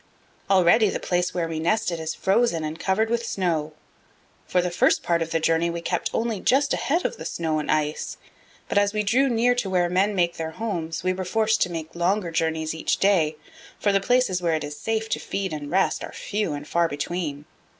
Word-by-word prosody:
Already 195 Hz, +3 st, +5 dB
the -, -, -3 dB
place 175 Hz, 0 st, 0 dB
where 170 Hz, -2 st, -1 dB
we 160 Hz, -1 st, -4 dB
nested 170 Hz, 0 st, 0 dB
is 160 Hz, 0 st, -3 dB
frozen 190 Hz, -4 st, +1 dB
and 155 Hz, +1 st, -4 dB
covered 200 Hz, +4 st, +1 dB
with 235 Hz, 0 st, 0 dB
snow. 165 Hz, -8 st, -1 dB, 0.7 s
For 180 Hz, -, +2 dB
the 180 Hz, 0 st, 0 dB
first 175 Hz, -, +2 dB
part 170 Hz, -1 st, +1 dB
of 165 Hz, -, -2 dB
the 165 Hz, -, 0 dB
journey 165 Hz, +1 st, +2 dB
we 170 Hz, 0 st, -3 dB
kept 175 Hz, +1 st, -1 dB
only 225 Hz, -3 st, -1 dB
just 280 Hz, +6 st, +2 dB
ahead 335 Hz, +6 st, 0 dB
of -, -, -1 dB
the -, -, -7 dB
snow 160 Hz, -2 st, -1 dB
and 150 Hz, -, -5 dB
ice, 150 Hz, 0 st, -1 dB, 0.5 s
but 205 Hz, -, +2 dB
as 205 Hz, 0 st, +1 dB
we 210 Hz, -, +1 dB
drew 255 Hz, +7 st, +3 dB
near 240 Hz, +1 st, +3 dB
to 245 Hz, -5 st, -2 dB
where 180 Hz, -2 st, +2 dB
men 195 Hz, +3 st, +2 dB
make 175 Hz, -2 st, +1 dB
their 160 Hz, 0 st, -4 dB
homes 170 Hz, -9 st, -3 dB
we 185 Hz, 0 st, +1 dB
were 185 Hz, 0 st, -4 dB
forced 220 Hz, +3 st, +1 dB
to 180 Hz, -, +2 dB
make 160 Hz, -1 st, -6 dB
longer 175 Hz, +1 st, 0 dB
journeys 160 Hz, -1 st, -1 dB
each 160 Hz, -, -1 dB
day, 170 Hz, -6 st, +3 dB, 0.4 s
for 205 Hz, -, +2 dB
the 195 Hz, 0 st, +2 dB
places 220 Hz, -5 st, +2 dB
where 170 Hz, -2 st, +1 dB
it 155 Hz, -, -2 dB
is 145 Hz, 0 st, -6 dB
safe 220 Hz, +8 st, -2 dB
to -, -, 0 dB
feed 195 Hz, -3 st, -3 dB
and 145 Hz, -1 st, -5 dB
rest 190 Hz, +4 st, +1 dB
are -, -, -7 dB
few 205 Hz, -6 st, -2 dB
and 145 Hz, 0 st, -6 dB
far 170 Hz, +1 st, +2 dB
between. 145 Hz, -1 st, -4 dB
175 Hz, 220 wpm, -24 LUFS, 160-205 Hz, 0.7 s, Already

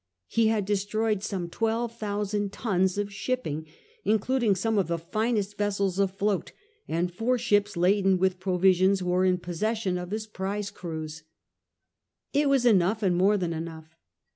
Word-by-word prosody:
He 225 Hz, -, +2 dB
had 215 Hz, -3 st, +1 dB
destroyed 210 Hz, +1 st, 0 dB
some 195 Hz, -4 st, -3 dB
twelve 225 Hz, +5 st, -1 dB
thousand 205 Hz, -2 st, -2 dB
tons 190 Hz, -4 st, 0 dB
of 205 Hz, 0 st, -2 dB
shipping, 160 Hz, -, -3 dB, 0.4 s
in 220 Hz, -, +3 dB
cluding 230 Hz, -2 st, +1 dB
some 220 Hz, +2 st, +1 dB
of 190 Hz, -, +1 dB
the 170 Hz, 0 st, -1 dB
finest 210 Hz, +3 st, -1 dB
vessels 200 Hz, -2 st, 0 dB
afloat^ 195 Hz, 0 st, 0 dB, 0.4 s
and 175 Hz, +2 st, -1 dB
four 240 Hz, +7 st, +1 dB
ships 205 Hz, -4 st, +1 dB
laden 190 Hz, +2 st, +3 dB
with 185 Hz, 0 st, +1 dB
provisions 185 Hz, 0 st, +3 dB
were 180 Hz, +1 st, +2 dB
in 185 Hz, -1 st, +3 dB
possession 185 Hz, +2 st, -2 dB
of 180 Hz, 0 st, -6 dB
his 215 Hz, +2 st, -3 dB
prize 200 Hz, 0 st, -4 dB
crews.1 160 Hz, -4 st, -6 dB, 1.1 s
It 290 Hz, +1 st, +3 dB
wafi 275 Hz, -3 st, +3 dB
enough 210 Hz, -1 st, +3 dB
and 185 Hz, -3 st, +3 dB
more 195 Hz, +4 st, +4 dB
than 175 Hz, -3 st, -2 dB
enough. 160 Hz, -1 st, -7 dB
200 Hz, 155 wpm, -27 LUFS, 180-215 Hz, 1.1 s, more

